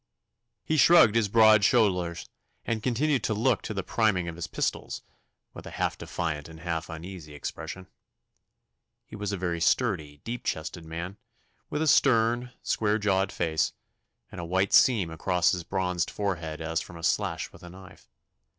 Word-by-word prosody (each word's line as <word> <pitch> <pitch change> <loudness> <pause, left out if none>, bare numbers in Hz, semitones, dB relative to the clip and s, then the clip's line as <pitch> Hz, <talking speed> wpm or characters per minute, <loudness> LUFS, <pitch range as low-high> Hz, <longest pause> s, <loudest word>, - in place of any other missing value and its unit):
He 155 - 0
shrugged 155 -9 +7
his 115 -2 +2
broad 110 0 +6
shoulders, 90 -8 +2 0.4
and 115 -1 -1
continued 130 +4 +1
to 110 - 0
look 115 +1 +2
to - - -6
the 95 - -2
priming 100 -5 +1
of 85 - -5
his 85 - -5
pistols, - - -3 0.5
with - - -10
a - - -9
half - - 0
defiant 80 -3 -4
and 80 0 -12
half 85 -1 -3
uneasy 80 -2 -8
expression. 80 +5 -6 1.2
He - - -11
was 105 -1 -3
a 100 - -2
very 85 -2 -2
sturdy, 85 - +1
deep 120 +1 -5
chested 80 +2 -4
man, 85 +4 -6 0.5
with 150 +1 -1
a - - 0
stern, 120 -3 +3
square 105 -1 +1
jawed 95 -2 +1
face, 80 -2 0 0.6
and 95 - -7
a - - -6
white 95 +3 0
seam 105 -10 +5
across 90 +2 +1
his 90 -2 -2
bronzed 90 -1 -1
forehead 85 -6 -3
as 80 0 -1
from 85 - -10
a 85 - -11
slash - - 0
with - - -16
a 90 - -10
knife. 95 +1 -15
95 Hz, 170 wpm, -27 LUFS, 85-110 Hz, 1.2 s, shrugged